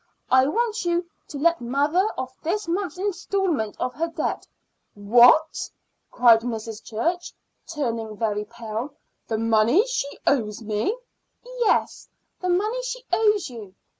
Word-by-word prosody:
I 260 +1 +5
want 455 +6 0
you 345 0 0 0.2
to 290 - -7
let 335 +1 +2
mother 290 - +1
off 260 0 -5
this 390 +5 -2
month's 360 +2 -2
installment 375 - -1
of 250 - -2
her 330 +3 -1
debt." 330 0 -3 0.5
"What?" 240 +9 +5 0.4
cried 235 -2 +5
Mrs. 225 -2 -5
Church, 335 +11 -2 0.4
turning 230 -9 -3
very 210 -1 -1
pale. 235 +4 -6 0.3
"The 220 - -1
money 225 - +4
that 480 - -4
she 385 - -3
owes 215 -6 +1
me?" 215 - -1 0.6
"Yes, 445 -3 +1 0.3
the 365 - -2
money 425 +8 +1
she - - -5
owes 420 -4 +3
you. 210 -5 -10
280 Hz, 135 wpm, -24 LUFS, 225-365 Hz, 0.6 s, I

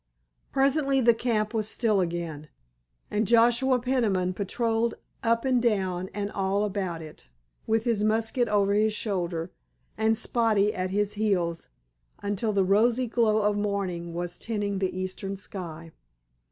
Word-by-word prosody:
Presently 275 0 +2
the 235 -2 +5
camp 225 -2 -1
was 215 -2 0
still 215 -5 +2
again, 170 -4 -4 0.6
and 210 0 0
Joshua 240 +3 +4
Peniman 220 -8 0
patrolled 225 +4 -1 0.3
up 230 +1 +1
and 255 -2 +2
down 190 -5 0
and 205 0 -3
all 195 +1 0
about 190 -5 -3
it, 155 - -13 0.4
with 225 0 +2
his 230 -4 0
musket 225 +3 +1
over 200 -1 +2
his 215 +1 +2
shoulder 175 -5 -2 0.5
and 220 0 +2
Spotty 220 -3 +2
at 185 0 -2
his 205 +1 0
heels 185 -6 -1 0.5
until 205 +2 -2
the 195 -2 +2
rosy 230 +6 +3
glow 220 -2 +2
of 210 0 +2
morning 190 -5 -2
was 175 0 -3
tinting 205 -3 -2
the 185 -1 -2
eastern 185 +1 -4
sky. 165 -5 -7
205 Hz, 140 wpm, -27 LUFS, 185-230 Hz, 0.6 s, the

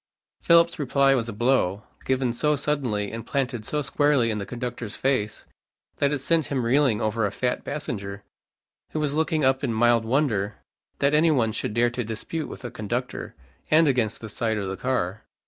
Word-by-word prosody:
Philip's 170 0 +4
reply 140 0 +3
was 120 -3 0
a - - -5
blow, 105 -4 +1 0.2
given 130 -2 +1
so 150 +5 +1
suddenly 130 -8 -1
and 115 0 -5
planted 130 -5 -2
so 150 -1 -1
squarely 140 -4 +2
in 105 - -2
the 100 - -5
conductor's 120 -3 -5
face, 130 -6 -1 0.5
that 140 0 +2
it 145 - +1
sent 160 +3 +1
him 130 -4 -1
reeling 130 -3 +3
over 110 +1 0
a 100 - +1
fat 125 -1 -2
passenger, 100 -9 -5 0.7
who 155 - -1
was 150 -2 0
looking 155 -1 +1
up 130 +1 +2
in 130 - 0
mild 115 0 +3
wonder 110 -5 0 0.4
that 140 +1 +2
any 155 +2 +5
one 120 -7 +2
should 105 - -3
dare 120 0 +3
to 125 0 -3
dispute 115 +8 -4
with - - -9
a 120 - -5
conductor, 120 +4 -4 0.3
and 160 +1 +5
against 120 -5 0
the 110 - -6
side 110 0 -1
of 100 -2 -3
the 95 - -3
car. 105 -5 -2
125 Hz, 190 wpm, -25 LUFS, 110-140 Hz, 0.7 s, any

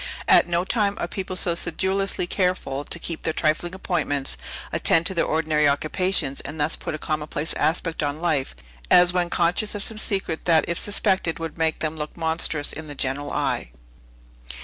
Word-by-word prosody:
At - - +6
no 175 0 +1
time 205 0 +1
are - - -2
people 185 +1 -5
so 175 -1 +2
sedulously 190 +3 -1
careful 175 -7 -1
to 170 - -3
keep 170 -1 -5
their 160 - -1
trifling 165 +4 0
appointments, 145 -7 -2 0.4
attend 165 0 +3
to 190 - +1
their 170 - +1
ordinary 155 -1 +2
occupations, 150 0 +1
and 145 +3 -7
thus 150 +2 +1
put - - -5
a - - -4
commonplace 155 0 -2
aspect 165 +1 0
on 145 0 -2
life, 155 -6 0 0.3
as 180 0 +6
when 175 -1 0
conscious 175 +6 +1
of 205 - +1
some 220 -1 -1
secret 195 -7 0
that 165 -2 +4
if 170 - 0
suspected 190 -4 +1
would 165 -2 -5
make 160 -1 0
them 155 0 -2
look 150 +2 -6
monstrous 160 -2 0
in 160 0 -8
the 145 - -8
general 135 +2 -2
eye. - - -1
165 Hz, 180 wpm, -24 LUFS, 155-180 Hz, 0.4 s, At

